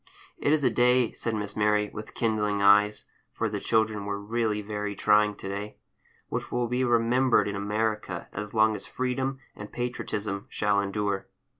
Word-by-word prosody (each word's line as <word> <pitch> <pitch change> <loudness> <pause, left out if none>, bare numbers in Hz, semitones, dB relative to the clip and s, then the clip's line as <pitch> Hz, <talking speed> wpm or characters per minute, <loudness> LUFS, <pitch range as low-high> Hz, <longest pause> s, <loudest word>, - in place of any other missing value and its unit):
"It 145 - +1
is 155 -2 +3
a 125 - +3
day," 125 +1 +3
said 115 -1 -3
Miss 105 -1 -4
Mary, 105 0 +2
with 105 +1 -8
kindling 105 -3 0
eyes 105 +1 +5 0.3
(for - - -1
the - - -3
children 110 -2 +1
were 100 0 -2
really 105 0 -1
very 105 0 -4
trying 105 +1 +3
to 95 - -8
day), 100 +2 -5 0.5
"which - - -4
will 120 -1 0
be 125 +2 0
remembered 120 +1 +3
in 100 - -3
America 105 -2 -2
as 105 0 -5
long 110 0 +4
as 105 - -4
freedom 130 +1 -2 0.2
and 105 - -9
patriotism 105 -5 -3
shall 105 -1 +1
endure." 100 0 -2
105 Hz, 170 wpm, -27 LUFS, 105-120 Hz, 0.5 s, eyes